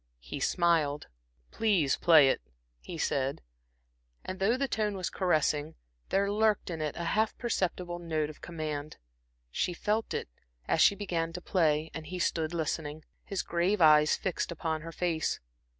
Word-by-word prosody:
He - - -7
smiled. 160 - +1 0.4
"Please 190 -11 +2
play 160 -5 +6
it," - - 0 0.4
he 170 - -8
said, 140 - -1 0.8
and 185 - -5
though 215 +6 +2
the 275 +1 0
tone 210 -4 -1
was 185 - -3
caressing, 155 -4 +1 0.3
there 200 +1 +2
lurked 215 -2 +1
in 160 -2 -4
it 150 -1 -2
a 170 - -3
half 215 +6 +1
perceptible 180 -6 -2
note 155 -3 -2
of 155 - -18
command. 155 -3 -5 0.5
She 175 - -1
felt 215 +4 -1
it, - - -3 0.4
as - - +2
she 200 - +6
began 170 -5 -2
to 180 - -4
play, 160 -4 +1
and 160 -1 -7
he 185 - -5
stood 160 -2 0
listening, 155 -2 -3 0.2
his 195 -2 -3
grave 175 +5 +1
eyes 155 -2 +6
fixed 185 -1 -2
upon 160 -1 -2
her 165 +1 -7
face. 165 -2 -1
170 Hz, 160 wpm, -30 LUFS, 155-190 Hz, 0.8 s, play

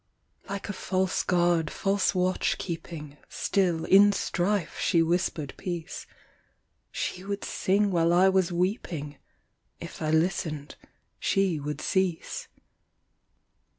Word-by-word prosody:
Like 200 0 -4
a 205 - -3
false 185 -1 0
guard, 175 -3 +2
false 195 0 0
watch 185 0 +1
keeping, 160 -4 -6
Still, 175 -5 0
in 200 +2 +7
strife, 190 -2 -1
she 165 -1 +3
whispered 165 -4 -1
peace; 175 -3 -5 0.8
She 180 - -3
would 200 +1 -4
sing 200 +2 +1
while 170 -1 +3
I 180 +2 +5
was 190 -1 +2
weeping; 170 - -2 0.6
If - - -9
I 155 - -1
listened, 160 -3 0 0.4
she 190 -5 +1
would 150 +1 -4
cease. 190 -3 -1
180 Hz, 115 wpm, -27 LUFS, 160-190 Hz, 0.8 s, in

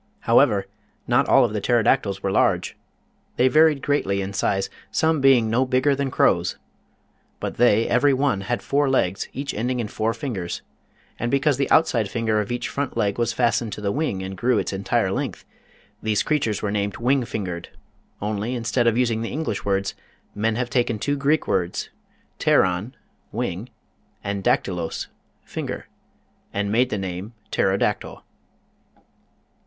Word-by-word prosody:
However, 100 -2 +4 0.4
not 120 0 +3
all 135 -2 +6
of 110 - -3
the 105 - -2
Pterodac 120 +3 +3
tyls 100 -2 -5
were 95 - 0
large. - - +1 0.6
They 125 - +4
varied 155 0 +4
greatly 100 -9 +1
in 100 0 -3
size, 95 0 0 0.2
some 160 -2 +1
being 130 -4 +5
no 115 +4 +2
bigger 130 +2 +2
than 140 0 -1
crows. - - +2 0.8
But - - -4
they, 115 -2 +4
every 130 +4 +3
one, 135 -6 +1
had 120 +5 -2
four 140 0 +1
legs, 100 -7 0
each 140 +1 -4
ending 125 +3 -1
in 115 - -2
four 110 +2 -1
fingers, 105 - -4 0.6
and 120 - -1
be 140 - +2
cause 140 -1 +2
the 140 - 0
outside 120 -10 +3
finger 110 -1 0
of 105 +2 -3
each 120 - -2
front 140 -1 -3
leg 100 +1 0
was 120 0 +1
fas 120 +1 +2
tened 110 -3 -5
to - - -7
the 100 -1 0
wing 130 -10 -1
and 95 0 -5
grew 120 +5 +1
its - - -1
entire 95 +1 0
length, 130 -3 -3 0.6
these 110 -1 +1
creatures 125 -10 0
were 105 - 0
named 100 -1 -1
Wing 130 +2 +2
Fingered 90 -7 -5 0.5
only, 105 +4 -2
instead 120 0 0
of 115 0 +3
using 115 -3 +1
the 115 - -3
English 150 -8 -3
words, 100 0 0 0.4
men 110 +2 0
have 120 +1 -2
taken 120 -3 +1
two 145 +7 -1
Greek 145 +2 +1
words, 90 -1 -1 0.5
"pteron" 95 +7 +2 0.4
(wing) - - -3 0.5
and 100 -1 -3
"dactylos" 95 - -1 0.4
(finger), - - -5 0.7
and 100 0 -1
made 125 +3 +3
the 105 - -2
name 95 +3 -5 0.2
Pterodactyl. 95 0 0
115 Hz, 165 wpm, -23 LUFS, 100-130 Hz, 0.8 s, all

